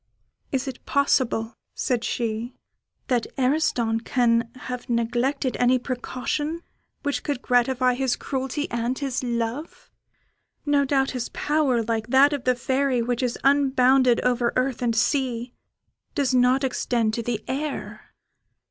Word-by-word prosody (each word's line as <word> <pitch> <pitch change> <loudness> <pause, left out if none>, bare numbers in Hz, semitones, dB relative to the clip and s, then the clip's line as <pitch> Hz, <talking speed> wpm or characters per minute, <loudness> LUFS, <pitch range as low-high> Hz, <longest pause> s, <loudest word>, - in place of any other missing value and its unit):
"Is 270 0 -1
it 260 -2 -7
possible," 250 -5 +1 0.2
said 245 -3 -1
she, 235 +1 -2 0.5
"that 245 -3 +1
Ariston 250 -4 +1
can 230 -1 +1
have 250 -1 -6
neglected 240 +3 0
any 250 +1 +4
precaution 265 +6 -3 0.4
which 285 -4 -1
could 285 -4 -3
gratify 250 0 +2
his 255 0 0
cruelty 270 +2 -3
and 235 +2 -1
his 270 -3 -2
love? 240 +5 -4 0.7
No 290 -1 +3
doubt 270 -1 +1
his 250 -2 -4
power, 290 -6 +1
like 225 -1 -2
that 270 +4 +5
of 280 -3 -4
the 255 0 +3
Fairy, 260 0 0
which 240 +1 -1
is 250 -2 -1
unbounded 265 -3 +4
over 245 -1 +1
earth 255 -1 0
and 235 -2 +1
sea, 245 -1 0 0.6
does 275 -3 +1
not 255 +2 +3
extend 240 -4 0
to 235 - -1
the 230 -2 -3
air." 285 +2 -5
255 Hz, 135 wpm, -24 LUFS, 240-270 Hz, 0.7 s, that